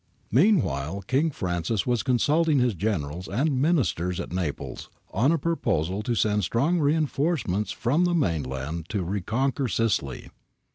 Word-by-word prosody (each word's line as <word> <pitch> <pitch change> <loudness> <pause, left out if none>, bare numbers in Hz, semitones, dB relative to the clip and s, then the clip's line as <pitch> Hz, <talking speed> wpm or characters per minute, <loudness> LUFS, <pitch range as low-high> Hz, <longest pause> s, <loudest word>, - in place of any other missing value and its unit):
^ - - -47 0.3
Meanwhile 100 - +2
King 135 - +1
Francis 90 - -2
was 120 -2 +1
consulting 150 +5 +2
his 125 -3 +2
Generals 90 -4 -2
and 130 +5 0
Ministers 125 - +1
at - - -5
Naples 90 -6 -4 0.2
on 125 +9 +2
a 165 - +3
proposal 95 - -1
to 120 +2 -1
send 105 0 +1
strong 140 - +1
reinforcements 145 - 0
from 145 +9 +1
the 175 0 +1
mainland 80 - -2
to 100 -4 -1
reconquer 115 +9 -1
Sicily. 100 - -1
110 Hz, 140 wpm, -26 LUFS, 90-145 Hz, 0.3 s, a